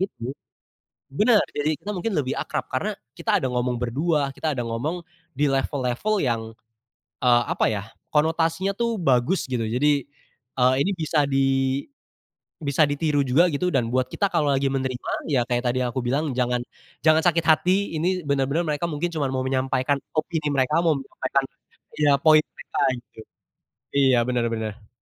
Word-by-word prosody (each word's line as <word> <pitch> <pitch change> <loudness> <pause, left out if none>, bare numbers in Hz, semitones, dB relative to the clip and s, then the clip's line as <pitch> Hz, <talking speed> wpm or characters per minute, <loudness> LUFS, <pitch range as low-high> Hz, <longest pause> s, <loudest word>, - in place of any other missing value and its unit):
itu 135 -9 -4 0.8
benar, 215 - +4 0.2
jadi 150 +1 0
kita 210 - -6
mungkin 200 +5 -2
lebih 130 -2 -1
akrab - - -3
karena - - 0 0.2
kita - - +1
ada 130 - -2
ngomong 125 0 0
berdua 140 +3 0
kita 155 - -2
ada 120 - -2
ngomong, 125 +10 -2 0.4
di 145 - +3
level-level 135 - 0
yang, 120 -7 0 0.8
eee, 120 -1 +4
apa - - +1
ya 105 -2 -2 0.3
konotasinya 165 +4 +2
tuh 235 +2 -1
bagus 140 - +2
gitu 115 -3 -1
jadi, 140 +4 +1 0.5
eee, 130 0 +4
ini 190 - +1
bisa 155 -3 +1
di 135 -1 +2 1.1
bisa 145 0 +2
ditiru 145 0 +1
juga 140 +8 +4
gitu 175 +3 -1
dan 120 -4 +1
buat 130 +2 +1
kita 200 - +1
kalau 160 -7 +1
lagi 135 0 +1
menerima 130 -2 -2 0.2
ya 125 -3 +2
kayak 120 -1 0
tadi 125 +1 0
yang 125 0 -2
aku 130 - -1
bilang 135 +2 -1
jangan 125 -1 +1 0.4
jangan 155 +2 +4
sakit 170 -2 +3
hati 180 +3 +3
ini 180 +4 0
bener-bener 140 +4 0
mereka 150 +1 -2
mungkin 155 +4 -1
cuma 140 -3 -1
mau 130 - -1
menyampaikan 130 +1 0 0.2
opini 155 -1 -1
mereka 140 +5 +2
mau 165 - +4
menyampaikan 135 0 -2 0.5
iya 150 -1 +3
poin 155 +1 +6
mereka - - -7 0.4
gitu, - - -13 0.8
iya 135 -3 +4
bener 125 -2 0
bener. 110 -2 -5
140 Hz, 165 wpm, -24 LUFS, 125-160 Hz, 1.1 s, poin